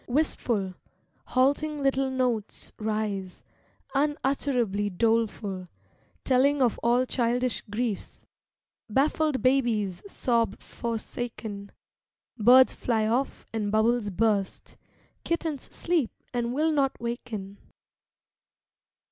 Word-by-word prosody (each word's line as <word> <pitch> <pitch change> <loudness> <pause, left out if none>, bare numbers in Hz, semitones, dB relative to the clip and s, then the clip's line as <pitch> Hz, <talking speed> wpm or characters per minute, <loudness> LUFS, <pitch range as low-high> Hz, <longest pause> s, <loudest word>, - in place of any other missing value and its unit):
Wistful, 240 -8 0 0.5
halting 285 +3 +1
little 270 0 +2
notes 250 -5 -2
Rise, 210 -4 -3 0.5
unutterably 270 -7 0
doleful, 205 -2 0 0.6
Telling 275 +2 +3
of 245 -4 +2
all 240 +2 +3
childish 245 -1 0
griefs 220 -1 -3 0.3
— - - -67 0.3
Baffled 290 +3 +1
babies 235 -8 +2
sob 230 -5 +1
forsaken, 225 -3 -5 0.6
Birds 250 +3 +6
fly 225 -3 0
off 245 +5 -1
and 210 -2 -1
bubbles 220 0 +2
burst, 200 0 0 0.5
Kittens 320 -5 -2
sleep 335 -8 0 0.2
and 240 -1 -1
will 310 +5 +1
not 275 -3 +1
waken. 225 -4 -5
240 Hz, 90 wpm, -27 LUFS, 215-265 Hz, 0.6 s, Birds